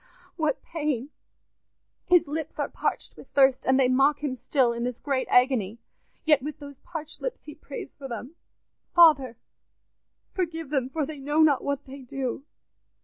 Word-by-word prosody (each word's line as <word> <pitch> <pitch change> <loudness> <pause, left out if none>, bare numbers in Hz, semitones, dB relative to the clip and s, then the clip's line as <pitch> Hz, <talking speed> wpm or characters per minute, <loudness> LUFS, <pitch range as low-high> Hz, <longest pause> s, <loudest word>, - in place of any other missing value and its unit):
Ah, - - -27
what 310 -5 -1
pain! 295 -4 -3 1.0
His 355 -2 +5
lips 310 +1 -4
are - - -1
parched - - -3
with - - -13
thirst, 270 -2 +4
and 260 +1 +4
they 260 - +5
mock 275 +4 +3
him 270 -3 -1
still 255 -1 +1
in 235 0 -4
this 245 -1 -3
great 270 -3 -1
agony; 250 -5 +3 0.5
yet 300 -3 +5
with 300 +3 -5
those 285 -2 -11
parched 310 -3 -8
lips - - -4
he 300 - -9
prays 285 -2 -9
for 275 - -6
them, 245 +4 -7 0.6
'Father, 285 -9 +6 1.0
forgive 330 -5 -3
them, 265 -3 0
for 300 +2 -1
they 300 0 -8
know 295 +3 +2
not 290 -4 +3
what 280 0 -2
they 275 +1 -10
do. 260 +1 -4
280 Hz, 170 wpm, -26 LUFS, 260-305 Hz, 1.0 s, Father